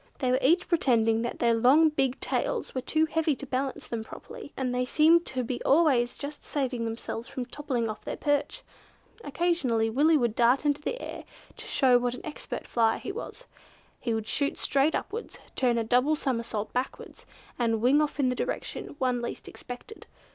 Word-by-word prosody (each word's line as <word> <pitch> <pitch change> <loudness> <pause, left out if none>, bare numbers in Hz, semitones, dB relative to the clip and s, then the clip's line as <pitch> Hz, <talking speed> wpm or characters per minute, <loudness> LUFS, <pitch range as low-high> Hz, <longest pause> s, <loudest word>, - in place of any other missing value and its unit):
They 255 -3 0
were 255 - +3
each 335 +7 +3
pretending 230 -9 +2
that 235 - -3
their 235 -1 +3
long 265 +8 +5
big 270 -4 0
tails - - -2
were 255 - -2
too 315 +5 +2
heavy 320 -2 0
to 280 - -7
balance 265 +1 -3
them 230 -2 -4
properly, 450 - -10
and 255 -2 -1
they 250 0 +1
seemed 320 +6 +4
to 255 -1 -2
be 245 +1 -4
always 270 -6 +3
just 290 +1 -7
saving 255 -5 -2
themselves 225 +1 -5
from 255 - -5
toppling 255 -3 -2
off 215 0 -6
their - - -5
perch. 290 -1 -1 0.6
Occasionally 270 -8 0
Willy 305 +6 +4
would 240 -5 +1
dart 245 +5 +3
into 290 0 +1
the - - -3
air, - - -7 0.3
to - - -10
show 255 -3 +4
what 245 0 -1
an - - -10
expert 310 - -6
flyer 225 -2 +2
he - - -5
was; 440 - -8 0.6
he 235 - -2
would 220 -1 -3
shoot 280 +5 -1
straight 280 +3 +2
upwards, 455 +3 -5 0.2
turn 245 -2 +2
a 230 - +1
double 250 +7 +3
somersault 230 -7 -3
backwards, 250 +2 -5 0.3
and 225 -2 +1
wing 260 +6 +4
off 300 -1 -2
in 260 -2 +3
the 250 - -1
direction - - -4
one 255 -3 0
least 240 - -6
expected. 250 - -10
255 Hz, 190 wpm, -28 LUFS, 240-295 Hz, 0.6 s, long